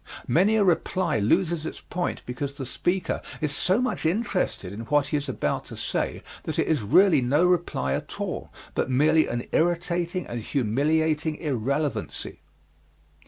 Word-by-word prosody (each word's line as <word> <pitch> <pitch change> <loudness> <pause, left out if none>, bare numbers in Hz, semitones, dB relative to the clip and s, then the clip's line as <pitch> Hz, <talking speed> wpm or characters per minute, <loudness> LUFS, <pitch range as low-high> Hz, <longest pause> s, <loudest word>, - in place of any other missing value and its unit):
Many 190 - +4
a 215 - +4
reply 175 - +1
loses 165 - +2
its 160 - -5
point 175 0 -3
because 140 +3 -4
the 135 - -4
speaker 175 +6 -1 0.2
is 150 -2 -1
so 185 +5 +2
much 255 0 -1
interested 175 - -1
in 105 - -7
what 145 +2 +2
he 150 - +1
is 145 -1 -3
about 130 - -1
to - - -9
say - - -2 0.2
that - - -4
it - - +2
is 155 -6 +2
really 160 - +5
no 145 +8 +3
reply 175 - +1
at - - -5
all - - -4 0.2
but - - -1
merely 150 +5 +4
an 120 0 -2
irritating 175 +1 0
and 120 - -4
humiliating 150 +7 +1
irrelevancy. 140 0 -2
155 Hz, 160 wpm, -26 LUFS, 130-175 Hz, 0.2 s, really